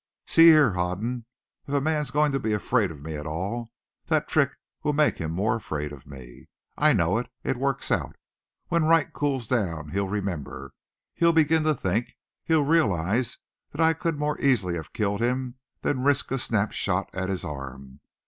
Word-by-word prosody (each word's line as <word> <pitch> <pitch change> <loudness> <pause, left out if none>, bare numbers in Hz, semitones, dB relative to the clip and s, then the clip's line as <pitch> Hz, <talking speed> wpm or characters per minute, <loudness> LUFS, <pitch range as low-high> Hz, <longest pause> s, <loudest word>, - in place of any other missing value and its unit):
"See 165 0 +6
here, 155 -7 +7
Hoden. 95 +7 -2 0.4
If 140 - -2
a - - +4
man's 150 -1 0
going 150 +2 +2
to 135 - 0
be 110 -4 -1
afraid 105 0 +1
of 75 -3 -10
me 80 -1 -5
at 75 +1 -6
all, 100 +9 -4 0.4
that - - +1
trick - - +3 0.3
will 150 - 0
make 150 0 +2
him 80 - -3
more 105 +6 +1
afraid 75 -9 -4
of 70 -2 -12
me. 65 -4 -12 0.3
I - - +4
know - - +2
it. - - -6
It - - 0
works - - -1
out. - - 0 0.5
When 170 -2 +2
Wright 165 -1 +3
cools 135 -4 -1
down 85 - -1
he'll 100 +4 -1
remember, 85 -10 -4 0.4
he'll 170 0 +3
begin 160 0 +4
to 155 -1 +3
think, 110 +1 -2 0.3
he'll 160 -3 +3
realize 115 - +1 0.4
that 145 - -9
I 160 0 +5
could 165 -1 -2
more 150 0 -1
easily 115 -10 +2
have 80 -3 -6
killed 100 0 -1
him 125 +1 -1 0.2
than 130 -3 0
risk 140 +1 +2
a 135 - 0
snapshot 100 -4 -1
at 95 0 -3
his 95 -2 -2
arm. 70 -1 -8
115 Hz, 185 wpm, -26 LUFS, 90-145 Hz, 0.5 s, here